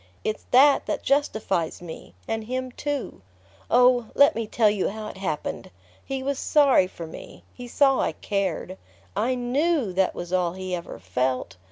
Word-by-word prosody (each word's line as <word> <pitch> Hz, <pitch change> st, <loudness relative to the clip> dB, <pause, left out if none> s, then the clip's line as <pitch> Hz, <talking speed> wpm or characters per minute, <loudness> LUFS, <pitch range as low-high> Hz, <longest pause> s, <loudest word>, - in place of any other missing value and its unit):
It's 215 Hz, -, -3 dB
that 275 Hz, +3 st, +5 dB
that -, -, -2 dB
justifies 220 Hz, -, 0 dB
me 165 Hz, -, -10 dB
and 225 Hz, -1 st, -2 dB
him 255 Hz, +2 st, -3 dB
too...Oh, 235 Hz, -, 0 dB
let 285 Hz, -, +6 dB
me 225 Hz, -1 st, -3 dB
tell 220 Hz, 0 st, +3 dB
you 205 Hz, -2 st, +1 dB
how 215 Hz, +1 st, -6 dB
it -, -, -10 dB
happened! 180 Hz, -6 st, -4 dB, 0.3 s
He 270 Hz, -1 st, -4 dB
was 275 Hz, 0 st, -2 dB
sorry 275 Hz, -10 st, +4 dB
for 170 Hz, -2 st, -8 dB
me: 160 Hz, -, -11 dB
he 245 Hz, -1 st, -9 dB
saw 270 Hz, +2 st, +3 dB
I -, -, 0 dB
cared. 190 Hz, -2 st, -3 dB, 0.4 s
I 235 Hz, +5 st, +1 dB
KNEW 255 Hz, -, 0 dB
that 190 Hz, 0 st, +1 dB
was 175 Hz, +1 st, -6 dB
all 180 Hz, -2 st, +1 dB
he 185 Hz, 0 st, -5 dB
ever 170 Hz, -1 st, -5 dB
felt. 125 Hz, -3 st, -2 dB
215 Hz, 165 wpm, -25 LUFS, 180-255 Hz, 0.4 s, let